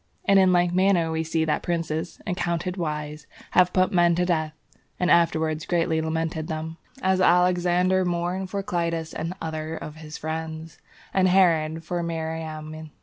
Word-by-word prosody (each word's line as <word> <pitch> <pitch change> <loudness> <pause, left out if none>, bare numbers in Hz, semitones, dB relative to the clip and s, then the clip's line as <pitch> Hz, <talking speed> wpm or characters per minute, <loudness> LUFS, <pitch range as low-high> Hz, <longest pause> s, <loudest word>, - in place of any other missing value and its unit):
And 195 0 +5
in 190 -1 +5
like 175 -1 +3
manner 185 -3 +3
we 160 0 -1
see 160 0 0
that 155 - 0
princes, 165 -2 -3
accounted 180 -2 -2
wise, 150 -3 -4 0.2
have 180 0 +4
put 185 0 +2
men 175 -2 +4
to 180 +1 +1
death, 160 -3 0 0.5
and 180 0 +2
afterwards 160 -2 +2
greatly 165 -2 +1
lamented 160 0 -2
them, 160 +1 -5 0.3
as 190 0 +2
Alexander 180 +1 +3
mourned 175 +2 -2
for 200 +1 -3
Clitus 170 -3 -2
and 165 +3 -4
others 160 0 -4
of 155 +1 -8
his 155 0 -8
friends, 160 0 -5 0.3
and 190 -1 +3
Herod 165 -4 +3
for 175 +1 -3
Mariamne. 160 -1 -5
165 Hz, 155 wpm, -25 LUFS, 160-180 Hz, 0.5 s, And